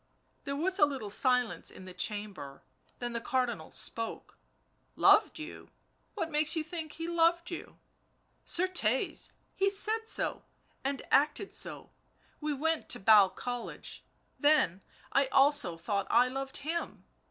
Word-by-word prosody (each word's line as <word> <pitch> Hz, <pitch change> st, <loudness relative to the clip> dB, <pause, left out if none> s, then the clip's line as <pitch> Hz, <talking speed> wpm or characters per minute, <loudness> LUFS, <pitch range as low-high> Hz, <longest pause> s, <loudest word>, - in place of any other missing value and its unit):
There 280 Hz, -, -3 dB
was 370 Hz, +6 st, 0 dB
a 295 Hz, -, +7 dB
little 260 Hz, -8 st, -5 dB
silence 250 Hz, -7 st, +2 dB
in 185 Hz, -, -10 dB
the 185 Hz, -, -9 dB
chamber, 195 Hz, -8 st, -4 dB, 0.3 s
then 240 Hz, -1 st, -4 dB
the 235 Hz, -, -3 dB
Cardinal 240 Hz, -10 st, -1 dB
spoke. 230 Hz, 0 st, -3 dB, 0.6 s
u -, -, -13 dB
Loved -, -, +6 dB
you? 310 Hz, +2 st, -9 dB, 0.2 s
— -, -, -42 dB
what 330 Hz, -6 st, -3 dB
makes 305 Hz, +1 st, +1 dB
you 320 Hz, -, 0 dB
think 320 Hz, -1 st, -7 dB
he 330 Hz, 0 st, -5 dB
loved 340 Hz, +1 st, +2 dB
you 345 Hz, -, -7 dB, 0.3 s
" -, -, -42 dB
Certes, 340 Hz, -10 st, 0 dB, 0.2 s
he 390 Hz, 0 st, +2 dB
said 435 Hz, +3 st, +2 dB
so, -, -, 0 dB, 0.4 s
and 275 Hz, 0 st, -2 dB
acted 300 Hz, +8 st, +2 dB
so... -, -, -4 dB, 0.5 s
we 300 Hz, 0 st, -2 dB
went 320 Hz, +3 st, -1 dB
to -, -, +1 dB
Basle 205 Hz, -1 st, +7 dB
College 245 Hz, +3 st, -5 dB, 0.2 s
— -, -, -41 dB
then, 195 Hz, -, +2 dB, 0.3 s
I 275 Hz, 0 st, +3 dB
also 270 Hz, -, +3 dB
thought 200 Hz, +4 st, -2 dB
I 250 Hz, +1 st, +4 dB
loved 270 Hz, +1 st, -3 dB
him 325 Hz, +4 st, -4 dB
275 Hz, 155 wpm, -31 LUFS, 225-325 Hz, 0.6 s, a